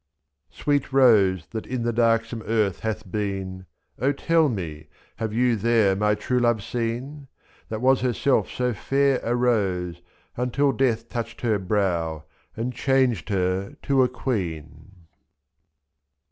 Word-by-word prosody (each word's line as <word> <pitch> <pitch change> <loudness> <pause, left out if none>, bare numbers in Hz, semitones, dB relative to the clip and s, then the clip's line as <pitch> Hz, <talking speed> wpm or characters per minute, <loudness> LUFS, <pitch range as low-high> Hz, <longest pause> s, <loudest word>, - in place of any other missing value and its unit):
Sweet 145 -2 -1
rose 105 - +4
that 110 -1 -5
in 125 -2 -3
the 120 0 0
darksome 115 0 +1
earth 105 -5 +1
hath 110 -4 -4
been, 95 -3 -4 0.3
O 135 +5 +2
tell 160 +2 +2
me 80 - -5
— - - -33
have 110 -1 -3
you 120 +2 +2
there 110 -2 +3
my 105 +1 +2
true 125 +4 -1
love 120 -3 +1
seen? 115 +1 -2
2/ 145 +2 -10
y. 140 - -14 0.4
That 110 0 -4
was 130 +1 +4
herself 130 +2 +1
so 125 -1 -1
fair 135 +5 +1
a 120 - -1
rose, 95 -8 0 0.3
until 125 +3 +1
Death 120 -4 0
touched 120 -1 -5
her 110 -4 +1
brow 90 -5 -1 0.3
and 120 +3 -2
changed 125 - +1
her 95 0 -1
to 135 -1 +3
a 125 - +3
queen. 90 - -5
115 Hz, 145 wpm, -24 LUFS, 95-125 Hz, 0.4 s, rose